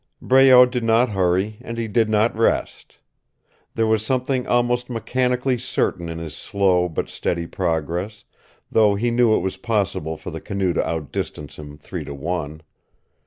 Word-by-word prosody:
Breault 130 Hz, -1 st, +7 dB
did 125 Hz, -2 st, -2 dB
not 115 Hz, +2 st, +3 dB
hurry, 95 Hz, +2 st, 0 dB
and 115 Hz, -1 st, -7 dB
he 115 Hz, -1 st, -2 dB
did 110 Hz, +1 st, +1 dB
not 110 Hz, +2 st, +2 dB
rest. 115 Hz, +1 st, -1 dB, 0.8 s
There 115 Hz, -, +1 dB
was 110 Hz, -1 st, +1 dB
something 130 Hz, +1 st, -1 dB
almost 120 Hz, 0 st, +1 dB
mechanically 125 Hz, +1 st, 0 dB
certain 85 Hz, -7 st, -2 dB
in 85 Hz, -, -5 dB
his 80 Hz, -2 st, -6 dB
slow 95 Hz, -3 st, +1 dB
but 80 Hz, -, -3 dB
steady 85 Hz, -1 st, -3 dB
progress, 85 Hz, +4 st, -3 dB, 0.5 s
though 105 Hz, -2 st, +4 dB
he 120 Hz, +4 st, 0 dB
knew 120 Hz, -2 st, +4 dB
it -, -, +1 dB
was 95 Hz, +1 st, -3 dB
possible 95 Hz, -7 st, -2 dB
for -, -, -8 dB
the -, -, -7 dB
canoe 95 Hz, -3 st, -1 dB
to -, -, 0 dB
outdistance 75 Hz, -2 st, -5 dB
him 75 Hz, -1 st, -10 dB
three 75 Hz, -, -7 dB
to 70 Hz, -, -7 dB
one. 80 Hz, 0 st, -4 dB
105 Hz, 165 wpm, -22 LUFS, 85-120 Hz, 0.8 s, Breault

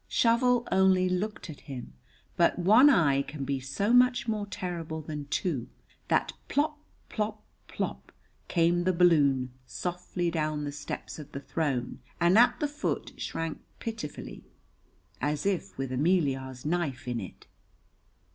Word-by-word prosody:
Shovel 240 Hz, +1 st, +3 dB
only 190 Hz, -1 st, +4 dB
looked 185 Hz, +4 st, -2 dB
at 155 Hz, -4 st, -9 dB
him, 125 Hz, -, -8 dB, 0.4 s
but 170 Hz, -, +3 dB
one 215 Hz, +11 st, +7 dB
eye 145 Hz, -, +4 dB
can 140 Hz, 0 st, -6 dB
be 135 Hz, 0 st, -1 dB
so 140 Hz, -, -1 dB
much 250 Hz, 0 st, +5 dB
more 210 Hz, -2 st, -1 dB
terrible 170 Hz, -5 st, -4 dB
than 150 Hz, -2 st, -6 dB
two, 145 Hz, -5 st, -2 dB, 0.4 s
that -, -, +1 dB
plop, 300 Hz, +1 st, 0 dB, 0.3 s
plop, 215 Hz, 0 st, -3 dB, 0.2 s
plop -, -, -4 dB, 0.4 s
came 175 Hz, 0 st, +2 dB
the 185 Hz, -, +3 dB
balloon 145 Hz, -7 st, +4 dB, 0.2 s
softly 175 Hz, +6 st, -3 dB
down 155 Hz, -2 st, -1 dB
the 145 Hz, -, -3 dB
steps 145 Hz, +2 st, -6 dB
of 150 Hz, -1 st, -10 dB
the 140 Hz, -, -4 dB
throne 140 Hz, -4 st, -2 dB, 0.2 s
and 170 Hz, +2 st, +4 dB
at 240 Hz, +3 st, +5 dB
the 295 Hz, -, +1 dB
foot 295 Hz, +2 st, -3 dB
shrank 165 Hz, -1 st, -3 dB, 0.2 s
pitifully, 180 Hz, -, -6 dB, 0.8 s
as 145 Hz, +2 st, -1 dB
if 195 Hz, -3 st, -1 dB
with 135 Hz, -1 st, -3 dB
Ameliar's 135 Hz, -4 st, 0 dB
knife 155 Hz, -6 st, -1 dB
in 120 Hz, -1 st, -1 dB
it. 95 Hz, -5 st, -9 dB
170 Hz, 140 wpm, -29 LUFS, 140-200 Hz, 0.8 s, one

